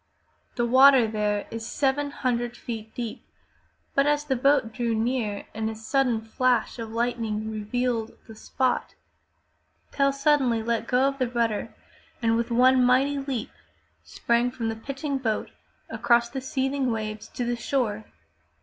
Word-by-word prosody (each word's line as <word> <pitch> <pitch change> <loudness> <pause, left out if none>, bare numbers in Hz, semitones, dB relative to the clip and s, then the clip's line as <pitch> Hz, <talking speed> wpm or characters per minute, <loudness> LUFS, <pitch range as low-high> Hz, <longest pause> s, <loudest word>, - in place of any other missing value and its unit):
The 240 - +1
water 260 0 +7
there 210 -1 -1
is 225 0 -5
seven 285 +4 0
hundred 240 -3 -2
feet 220 -2 -7
deep, 235 -3 -5 0.7
but 275 +1 +3
as 295 0 +1
the 270 -3 0
boat 260 -3 +2
drew 235 -1 -1
near 220 -3 -1
and 220 0 -2
a 220 - -5
sudden 235 +1 0
flash 240 +1 0
of 225 -1 -5
lightning 225 -2 -2
revealed 225 +2 -2
the 225 - -11
spot, 255 +4 -2 1.0
Tell 275 0 +2
suddenly 275 -5 +2
let 230 0 -1
go 250 +1 +2
of 275 0 -3
the 255 -2 0
rudder 230 -3 -1 0.4
and 225 -1 +2
with 235 +1 -1
one 255 +2 +5
mighty 270 +3 +3
leap 270 -5 -4 0.5
sprang 235 - 0
from 235 -2 -3
the 225 - -3
pitching 275 +4 -4
boat 225 -4 -2 0.4
across 235 -1 +2
the 265 - -4
seething 265 0 -1
waves 215 -1 -4
to 245 - -4
the 240 0 0
shore. 230 -4 -1
240 Hz, 150 wpm, -26 LUFS, 225-265 Hz, 1.0 s, water